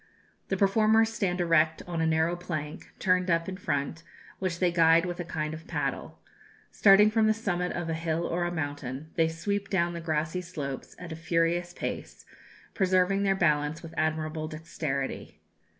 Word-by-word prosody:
The 195 - -1
performers 220 +3 +4
stand 190 -5 -1
erect 160 -2 +3
on 170 -2 -3
a 160 - +2
narrow 160 +2 +2
plank, 155 -4 -6
turned 180 0 +2
up 165 0 +2
in 190 - -4
front, 145 -3 -2 0.4
which 185 -3 -2
they 180 0 +2
guide 165 0 +5
with 175 0 -4
a - - -1
kind 155 -2 -3
of 160 +1 -9
paddle. - - -3 0.5
Starting 210 +1 +6
from 220 0 +3
the 215 - +3
summit 180 -5 -1
of 175 -1 -3
a 165 - -1
hill 165 +1 -1
or 175 +1 -1
a 175 - -2
mountain, 145 -2 -4
they 165 -1 +3
sweep 200 +5 -3
down 175 -3 +1
the 170 - -5
grassy 160 +2 -1
slopes 150 -7 -6
at 180 -2 -9
a - - -4
furious 170 +1 0
pace, - - -5 0.5
preserving 185 0 +2
their 195 -1 +2
balance 150 -3 +1
with 165 0 -9
admirable 155 0 -1
dexterity. 155 -3 -4
170 Hz, 175 wpm, -28 LUFS, 160-185 Hz, 0.5 s, Starting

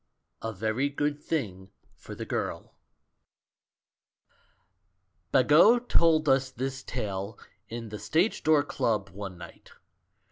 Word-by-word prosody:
A 115 - -3
VERY 110 +7 -1
GOOD 145 +1 -1
THING 100 - -3 0.2
FOR - - -11
THE - - -6
GIRL - - -4 2.6
Bagot 170 - +5
told 160 -2 +4
us 135 -1 +3
this 130 +1 -4
tale 100 -4 -4 0.3
in 115 -1 -6
the 105 0 -7
Stage 175 +8 +1
Door 155 -2 +4
Club 110 -8 -1
one 95 -1 -8
night. 85 -1 -13
130 Hz, 110 wpm, -28 LUFS, 105-145 Hz, 2.6 s, Bagot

